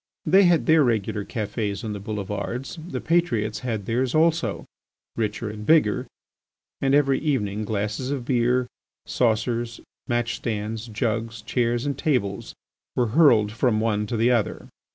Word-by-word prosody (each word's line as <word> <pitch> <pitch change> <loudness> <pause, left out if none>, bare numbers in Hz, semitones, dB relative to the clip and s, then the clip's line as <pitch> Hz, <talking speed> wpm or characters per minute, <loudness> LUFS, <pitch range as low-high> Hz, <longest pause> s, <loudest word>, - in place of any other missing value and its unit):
They 195 +1 +6
had 175 -2 +3
their 160 -2 +5
regular 110 -4 0
cafés 105 -2 -3
on 110 -2 -3
the 100 - -5
boulevards. 105 - -4
The - - -4
patriots 115 -12 +1
had 110 -5 -3
theirs 125 +4 0
also, 160 -9 +1 0.5
richer 115 +1 -2
and 105 0 -8
bigger, 145 -5 +3 0.7
and 135 0 +3
every 140 -2 +3
evening 110 -8 -1
glasses 105 +4 -2
of 135 -4 -3
beer, 125 0 +2 0.4
saucers, 115 0 0 0.3
match 120 -2 0
stands, 110 +1 -4
jugs, 115 0 -2
chairs, 120 0 0
and 140 -1 -1
tables 125 -9 -1 0.4
were 120 -2 +1
hurled 115 -6 +5
from 115 -1 +1
one 105 -1 0
to 115 - -2
the 115 +3 +3
other. 115 -4 -1
115 Hz, 145 wpm, -24 LUFS, 105-130 Hz, 0.7 s, They